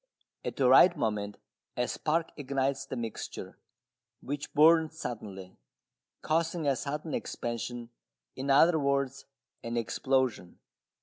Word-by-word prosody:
At - - -4
the 130 - +2
right 170 +7 +7
moment 105 -5 -2 0.4
a 125 0 +1
spark 165 +1 -1
ignites 135 -1 -1
the - - -5
mixture, 115 -3 -6 0.6
which 145 +1 -5
burns 160 +1 +5
suddenly, 100 - -7 0.6
causing 165 0 0
a 140 - +3
sudden 150 +4 -4
expansion, 120 0 -4 0.4
in 135 +2 -4
other 160 +4 +6
words, 140 -1 -1 0.3
an 115 0 -4
explosion. 125 -4 0
135 Hz, 115 wpm, -30 LUFS, 120-150 Hz, 0.6 s, right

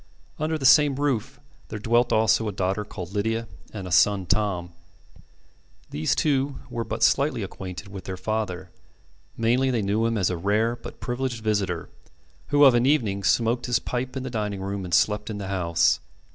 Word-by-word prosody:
Under 155 +1 -1
the 135 - -4
same 145 +1 +6
roof 135 -2 -1 0.3
there 110 - -6
dwelt 120 +3 +2
also 110 0 +3
a - - -1
daughter 95 +2 -1
called 90 -3 -8
Lydia 110 +2 -1 0.2
and 95 -4 -6
a - - -7
son, 95 +2 +4
Tom. 90 -3 0 1.2
These 75 +1 0
two 140 -2 +1 0.2
were 115 - -2
but - - -3
slightly - - +2
acquainted 95 +1 -7
with 100 -1 -9
their 95 -1 -5
father. 95 -4 -3 0.7
Mainly, 120 +4 +2
they 120 -4 0
knew 105 +3 +1
him 115 -1 -1
as 95 -3 +1
a 90 - -2
rare 105 +6 +1
but - - -11
privileged 125 -2 -3
visitor, 95 -6 -1 0.6
who 145 0 +4
of 135 - +7
an 120 +1 +3
evening 110 -9 +1
smoked 115 +4 +1
his 120 - +2
pipe 130 +1 -4
in 130 - -4
the 130 - -5
dining 105 -4 -3
room 100 0 -4
and 90 - -6
slept 105 +4 +1
in 105 - -4
the 100 -2 -5
house. 85 -3 +2
110 Hz, 185 wpm, -25 LUFS, 95-120 Hz, 1.2 s, of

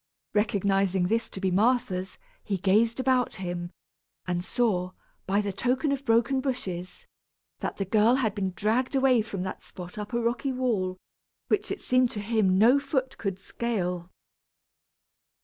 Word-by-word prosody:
Recognizing 195 -3 +1
this 230 +1 0
to - - -7
be 190 -1 0
Martha's, 195 -2 +1 0.3
he 200 -3 -1
gazed 215 +6 +2
about 255 -1 +2
him, 175 -2 -4 0.6
and 175 -1 -1
saw, 185 -5 0 0.3
by 200 +2 +2
the 200 -1 -3
token 255 +8 0
of 275 0 -2
broken 235 +3 +3
bushes, 185 -10 -4 0.5
that - - -4
the 195 - -1
girl 215 +5 +4
had 225 -6 +1
been 195 -2 -2
dragged 230 +6 0
away 260 -3 +4
from 200 -4 -4
that 190 - -5
spot 180 +2 -9
up 210 +2 -6
a 235 - 0
rocky 240 +4 0
wall, 215 -8 0 0.5
which 405 - +1
it 395 - -4
seemed 255 -1 +3
to 210 - -4
him 205 -3 +2
no 240 +7 +6
foot 265 -2 -2
could 195 -3 -2
scale. 185 -5 -3
215 Hz, 155 wpm, -27 LUFS, 190-250 Hz, 0.6 s, no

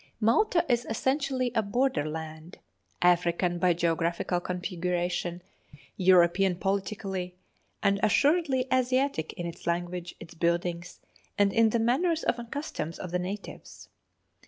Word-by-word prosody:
Malta 335 - +3
is 240 -1 +1
essentially 260 +1 0
a 225 - +2
border 220 - 0
land 160 +2 -7 0.5
African 175 0 +2
by 180 0 +4
geographical 170 +1 0
configuration, 180 -1 -2 0.5
European 185 0 +4
politically, 195 -1 -3 0.5
and 200 -1 +3
assuredly 275 - +3
Asiatic 255 - +1
in 175 - -5
its 170 0 -8
language, 175 0 -2
its 165 - -11
buildings, 170 +1 -2 0.4
and 200 -1 +3
in 225 -1 +4
the 235 - +1
manners 310 +9 +1
and 235 -1 -2
customs 255 - -4
of 180 - -7
the 180 - 0
natives. 195 +3 -7
185 Hz, 120 wpm, -28 LUFS, 175-240 Hz, 0.5 s, by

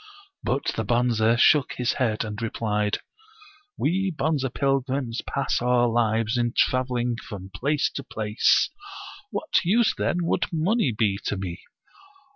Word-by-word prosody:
But 135 +3 -1
the 110 - -1
Bonze 120 0 +2
shook 145 0 +4
his 125 0 0
head, 115 -4 0
and 105 0 -6
replied: 105 -2 -1 0.8
We 190 +5 +1
Bonze 155 -3 -1
pilgrims 135 -3 -1
pass - - -1
our 120 0 +3
lives 115 0 +1
in 120 -1 0
traveling 125 -2 +1
from 100 -5 -9
place 145 +9 +1
to 140 - -5
place. 110 -4 +2 0.6
What 315 - 0
use, 215 +6 +3
then, 175 - -1
would - - 0
money 170 - +1
be 105 -3 0
to 100 - -1
me? 90 -2 -5
120 Hz, 135 wpm, -25 LUFS, 110-140 Hz, 0.8 s, shook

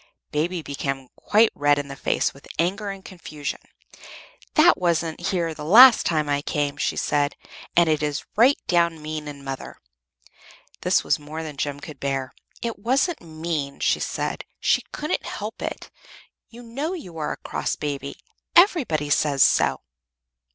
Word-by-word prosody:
Baby 165 +3 -1
became 135 -2 -4
quite 220 +2 +3
red 145 0 +3
in 145 -1 -3
the 135 - -7
face - - 0
with 140 - -16
anger 195 +5 0
and 195 -1 -8
confusion. 155 -5 -6 1.0
"That 345 +3 +7
wasn't 170 0 0
here 170 -3 0
the 150 - -8
last 230 +9 +8
time 155 -3 +1
I 145 0 0
came," 145 -1 -1
she - - -1
said. 145 0 0 0.4
"And 170 -1 +5
it 155 -1 +1
is 150 -1 -2
right 250 +6 +5
down 170 -2 +2
mean 155 0 -5
in 140 -1 -8
mother!" 135 -1 -6 1.0
This - - +2
was - - +1
more 155 +2 -7
than 155 -2 -7
Jem 140 0 -3
could 145 -1 -10
bear. 135 -1 -2 0.3
"It 230 -3 -3
wasn't 270 - +1
mean," 155 -3 -4
she - - +2
said. - - -3 0.2
"She - - +2
couldn't 300 - -3
help 215 +2 -6
it. - - -5 0.6
You 240 +1 -12
know 275 +9 -3
you 180 - -8
are 150 - -2
a - - -9
cross - - -3
baby 140 -2 -4 0.4
everybody 255 - +4
says 140 -2 +3
so." - - +3
155 Hz, 160 wpm, -24 LUFS, 145-195 Hz, 1.0 s, last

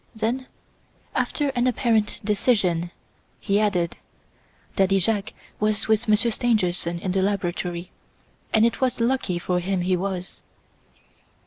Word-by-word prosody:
Then, 235 +4 -1 0.7
after 290 -2 0
an 250 -2 +1
apparent 230 -4 +1
decision, 200 -5 +1 0.5
he 200 0 +1
added: 180 -5 +1 0.8
"Daddy 195 0 +3
Jacques 205 +2 0 0.3
was 215 0 +1
with 220 +1 +2
Monsieur 215 +2 +3
Stangerson 185 -7 +1
in 185 +2 -3
the 190 +1 +1
laboratory 180 -2 -2 0.6
and 220 +1 +5
it 235 - 0
was 255 -2 +1
lucky 235 -6 +1
for 180 +1 0
him 185 +1 -1
he 185 +1 +2
was." 185 0 -4
205 Hz, 125 wpm, -24 LUFS, 180-225 Hz, 0.8 s, and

